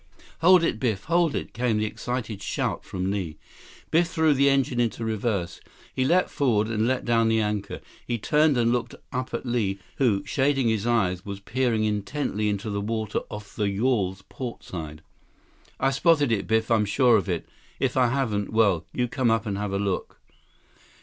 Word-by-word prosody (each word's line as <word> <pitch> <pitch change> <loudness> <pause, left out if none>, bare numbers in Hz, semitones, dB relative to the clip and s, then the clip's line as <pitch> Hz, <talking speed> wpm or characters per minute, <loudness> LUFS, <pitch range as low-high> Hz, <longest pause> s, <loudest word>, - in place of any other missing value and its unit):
"Hold 180 +1 +6
it, 110 - 0
Biff! 110 -6 -1
Hold 170 -2 +2
it!" - - -4
came 120 -2 0
the 105 - 0
excited 115 -2 -4
shout - - -2
from 95 +1 -3
Li. 90 -6 -3 0.5
Biff 170 +2 +4
threw 160 -3 +2
the 140 0 +4
engine 135 -3 +1
into 115 -1 0
reverse. 110 -5 -2 0.3
He 130 - 0
leaped 180 +6 +2
forward 110 -6 +1
and 110 0 0
let 130 0 0
down 115 -1 +3
the 115 0 +3
anchor. 105 -1 -2 0.3
He 120 - -1
turned 150 +4 +3
and 120 -1 +3
looked 120 -1 -1 0.2
up 130 0 -3
at - - -4
Li, 110 -6 0 0.2
who, 110 -8 +2
shading 135 -3 +1
his 110 0 0
eyes, 95 -7 +1
was 100 -1 -6
peering 115 +1 0
intently 105 +1 -1
into 105 +1 -3
the 100 0 -2
water 110 0 -2
off 105 0 -9
the 105 -2 0
yawl's 100 -3 0
portside. 80 - -7 0.8
"I've 135 0 +2
spotted 145 -2 +3
it, 105 -3 0
Biff. 110 +1 +1
I'm 110 -2 +4
sure 120 +3 +4
of 100 -2 0
it. 85 -2 -2 0.3
If 130 -2 0
I 130 -2 +4
haven't, 115 -6 -1
well—you 110 +2 +1
come 125 -1 0
up 115 0 +1
and 100 -2 -2
take 105 +1 -2
a 100 - -3
look." 100 -1 -2
115 Hz, 185 wpm, -25 LUFS, 100-130 Hz, 0.8 s, Hold